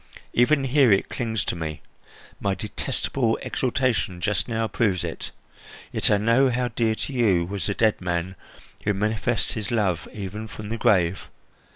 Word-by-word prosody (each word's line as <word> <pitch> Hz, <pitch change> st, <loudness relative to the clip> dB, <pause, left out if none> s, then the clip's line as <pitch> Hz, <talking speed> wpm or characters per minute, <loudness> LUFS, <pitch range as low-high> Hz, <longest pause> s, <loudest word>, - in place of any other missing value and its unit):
Even 135 Hz, +4 st, +4 dB
here 135 Hz, -2 st, +4 dB
it 95 Hz, -, +3 dB
clings 110 Hz, -3 st, -2 dB
to -, -, -1 dB
me. 80 Hz, -3 st, -5 dB, 0.6 s
My 100 Hz, -1 st, 0 dB
detestable 115 Hz, +3 st, -1 dB
exultation 120 Hz, -8 st, 0 dB
just 95 Hz, +1 st, 0 dB
now 115 Hz, -1 st, 0 dB
proves 100 Hz, -4 st, +1 dB
it. -, -, -5 dB, 0.6 s
Yet -, -, +1 dB
I 105 Hz, -, +4 dB
know 115 Hz, +6 st, +4 dB
how 125 Hz, 0 st, 0 dB
dear 110 Hz, -1 st, +1 dB
to 140 Hz, -, -5 dB
you 100 Hz, -9 st, +3 dB
was 100 Hz, +2 st, -3 dB
the 100 Hz, -, -1 dB
dead 110 Hz, -3 st, +2 dB
man 90 Hz, +1 st, -2 dB, 0.5 s
who 105 Hz, -1 st, +1 dB
manifests 110 Hz, +3 st, 0 dB
his 105 Hz, -3 st, -4 dB
love 100 Hz, -8 st, 0 dB
even 105 Hz, +2 st, -6 dB
from 105 Hz, 0 st, -8 dB
the 115 Hz, -, -2 dB
grave. 90 Hz, -3 st, +2 dB
110 Hz, 165 wpm, -24 LUFS, 95-120 Hz, 0.6 s, Even